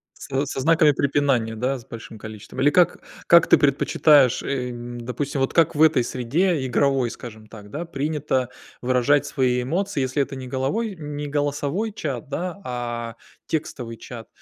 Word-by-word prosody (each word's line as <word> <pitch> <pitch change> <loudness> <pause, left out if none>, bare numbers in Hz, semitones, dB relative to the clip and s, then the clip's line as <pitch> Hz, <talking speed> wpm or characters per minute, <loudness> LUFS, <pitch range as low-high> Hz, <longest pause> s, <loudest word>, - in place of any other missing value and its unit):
Со 135 +1 -2
со 135 - -4
знаками 160 +2 +4
препинания, 135 -5 +1
да, 130 +4 -1
с 115 - -16
большим 115 -1 -10
количеством? 110 +2 -9
Или 145 - +5
как 175 +4 +3 0.3
как 170 -1 +7
ты - - +6
предпочитаешь, 140 -1 +4
эм, 120 -2 -4
допустим 135 +4 -3
вот 135 - 0
как 165 -1 +4
в 150 - 0
этой 155 -6 +5
среде, 140 +6 0
игровой, 130 0 +1
скажем 110 -2 -10
так, 105 -2 -13
да, 160 +7 -4
принято 145 -4 -1 0.3
выражать 130 +3 +2
свои 125 -2 0
эмоции, 175 +4 -1
если 130 +2 0
это 140 0 -3
не 130 -1 -7
головой 165 - -2
не 150 -1 -5
голосовой 145 +8 -1
чат, 145 - -5
да, 180 +6 -4
а 120 -2 -4 0.3
текстовый 125 -7 -4
чат, 115 -2 -10
135 Hz, 160 wpm, -23 LUFS, 125-150 Hz, 0.3 s, как